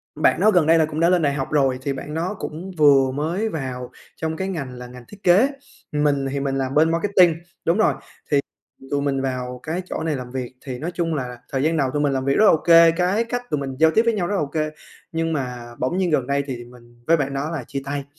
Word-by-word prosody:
bạn - - +2
đó 215 - +5
gần 180 -5 +4
đây 165 +1 +6
là 160 - +4
cũng 155 0 -5
đã 170 +1 +4
lên 180 -2 +3
đại 145 -2 +1
học 135 -2 -3
rồi, 135 -4 +2
thì 140 +1 -2
bạn 140 +3 -7
đó 170 +6 -2
cũng 175 +5 -6
vừa 140 -3 +5
mới 165 +10 -1
vào 130 - -5 0.2
trong 160 0 -3
cái 190 - -2
ngành 150 -9 -4
là 125 0 -9
ngành 125 0 -12
thiết 205 0 -15
kế, 190 +8 +5 0.4
mình 145 -2 +1
thì 140 - -2
mình 135 -1 -1
làm 135 0 -2
bên 160 +2 +4
marketing, 175 -1 +4 0.3
đúng 170 +3 +2
rồi, 220 - +3 0.9
thì 135 - -14
tụi 145 - 0
mình 140 -1 0
vào 125 -1 -4
cái 170 +4 -3
chỗ - - -4
này 160 -2 -1
làm 125 -1 -7
việc. 130 -1 -5
Thì 130 -3 -5
nói 160 +6 -3
chung 165 -2 -1
là 125 -4 -4
thời 135 -1 0
gian 160 +2 +1
đầu 135 -4 +1
tụi 145 - 0
mình 145 -2 +2
làm 130 -1 -1
việc 140 +1 +1
rất 215 - +5
là - - +8
ô - - +5
kê, 165 +1 +6
cái 180 +6 +1
cách 245 +1 -3
tụi 150 - 0
mình 135 -1 -5
giao 160 0 +6
tiếp 220 - +3
với 230 -1 +1
nhau 190 -5 -1
rất 205 - -2
là 195 - +1
ô 150 - -1
kê, 155 +1 -2 0.4
nhưng 165 0 -1
mà 125 -4 -4
bỗng 130 +7 -1
nhiên 185 -2 +1
gần 135 -5 +1
đây 140 +1 0
thì 125 -3 -5
mình 120 -1 -18
với 165 - +5
bạn 140 -3 -2
đó 140 +3 -2
là 150 -7 -4
chia 140 +4 -5
tay, 140 0 -3
150 Hz, 275 wpm, -22 LUFS, 135-165 Hz, 0.9 s, là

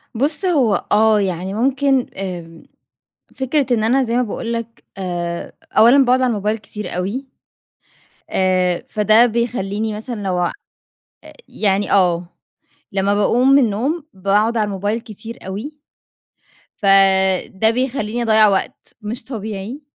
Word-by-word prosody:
بص، 295 - -1
هو 265 - +2
آه، 215 0 +4
يعني 190 0 -2
ممكن 265 +2 +1
آمم، 175 -4 -7 0.7
فكرة 265 +2 0
إن 220 -1 0
أنا 260 +3 +3
زي 235 +1 -1
ما 250 - +3
باقول 230 +1 -4
لك، 230 0 -6
آآ، 175 -2 -4 0.2
أولًا 250 +5 +6
باقعد 255 +1 +3
على 255 -1 +2
الموبايل 210 +1 -1
كتير 210 -3 -8
أوي، 210 +10 -3 1.0
آآ، 185 -2 +1
فده 215 +3 +4
بيخلّيني 220 -2 -2
مثلًا 220 -1 -6
لو 185 -2 -1
آآ، 175 - 0 1.0
يعني 200 -1 0
آه، 180 -3 +3 0.7
لمَّا 200 +1 +1
باقوم 240 +5 +2
من 275 - +7
النوم 265 +10 -1
باقعد 205 +5 +1
على 215 - +2
الموبايل 205 +3 -2
كتير 225 +1 -10
أوي، 210 +11 -5 1.0
فده 195 +1 +3
بيخلّيني 240 -2 -2
أضيَّع 220 -1 +5
وقت 195 -1 -2
مش 215 +3 -5
طبيعي، 220 +2 -6
215 Hz, 130 wpm, -19 LUFS, 195-240 Hz, 1.0 s, من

